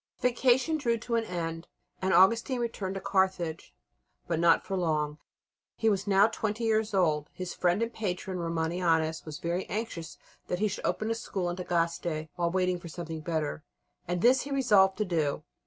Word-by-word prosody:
The 250 - +4
vacation 260 +6 +2
drew 235 -5 +1
to 235 +2 -6
an 230 -1 +2
end, 165 -2 -4 0.3
and 190 0 +1
Augustine 230 +8 +4
returned 205 -5 -3
to 195 - -4
Carthage, 190 -4 0 0.6
but 165 -2 0
not 170 -1 +4
for 195 - -2
long. 155 -4 0 0.6
He 225 -1 +2
was 200 0 -1
now 200 0 +6
twenty 220 0 -2
years 220 -1 +1
old. 155 -5 +2
His 185 -1 -5
friend 180 +5 +1
and 230 +1 -3
patron, 185 -2 -3
Romanianus, 165 -1 0
was 155 -2 -6
very 175 +2 -3
anxious 195 -6 -4 0.3
that 180 - -1
he 215 +3 +1
should 205 - -3
open 215 +1 -1
a - - +3
school 190 -5 -3
in - - -4
Tagaste 170 -3 -1
while 170 -1 0
waiting 180 0 0
for 170 - -9
something 165 -1 -6
better, 155 - -2 0.4
and 175 +1 -2
this 250 +2 +6
he 285 - -7
resolved 210 -9 +4
to 210 - 0
do. 155 -5 -1
185 Hz, 185 wpm, -29 LUFS, 165-215 Hz, 0.6 s, now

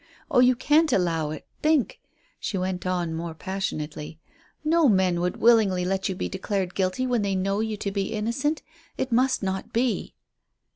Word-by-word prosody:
Oh, - - +4
you 250 0 +6
can't 300 +5 +3
allow 165 -4 +1
it. 155 -1 -7 0.2
Think," 305 -4 +2 0.4
she 195 - -3
went 185 0 -2
on, 175 -3 -1
more 165 0 -4
passionately; 155 -4 -4 0.4
"no 315 -2 +4
men 185 -4 +2
would 180 0 -1
willingly 210 -6 +4
let 190 +1 -1
you 190 - -2
be - - -2
declared 190 -1 -2
guilty 190 +7 0
when 245 -3 +1
they 200 -1 0
know 195 +2 0
you 220 -1 -2
to 200 -1 -3
be 195 0 -2
innocent. 235 +8 -1 0.3
It 260 - -2
must 255 0 +2
not 190 0 -3
be." 235 0 -1
195 Hz, 175 wpm, -25 LUFS, 180-240 Hz, 0.4 s, you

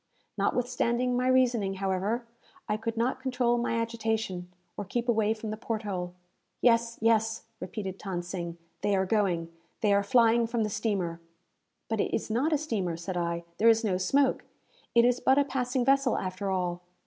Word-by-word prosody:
Notwithstanding 245 0 0
my 250 +1 +1
reasoning, 240 -6 +3
however, 195 +5 -1 0.4
I 210 - +1
could 225 +1 -4
not 250 +3 0
control 250 -2 +1
my 235 -1 0
agitation, 220 -6 -2 0.2
or 205 - -4
keep 235 +5 -3
away 220 -2 +2
from 215 -1 -5
the 215 - -4
port 225 -1 -3
hole. 180 -3 -4 0.4
"Yes, 230 -1 +3
yes," 225 0 +2 0.2
repeated 190 0 -5
Than 185 -3 -3
Sing, 170 -1 -5 0.2
"they 205 -1 +2
are 190 0 +2
going. 180 -5 0 0.3
They 210 -3 +3
are 200 - +4
flying 230 +2 +4
from 230 -1 0
the 210 - -2
steamer!" 195 -6 -1 0.7
"But 220 -2 0
it - - -1
is 220 - -3
not 260 +8 +1
a 305 - +4
steamer," 205 - -2
said 180 +2 -5
I. 170 -1 -1 0.2
"There 230 - +6
is 225 +1 +4
no 185 -4 +1
smoke. 270 +9 +2 0.5
It 235 0 +6
is 245 0 +3
but 265 - +3
a 285 - +4
passing 250 -2 -1
vessel, 275 -1 +3
after 185 +1 -3
all." 180 -2 -1
220 Hz, 180 wpm, -29 LUFS, 190-240 Hz, 0.7 s, There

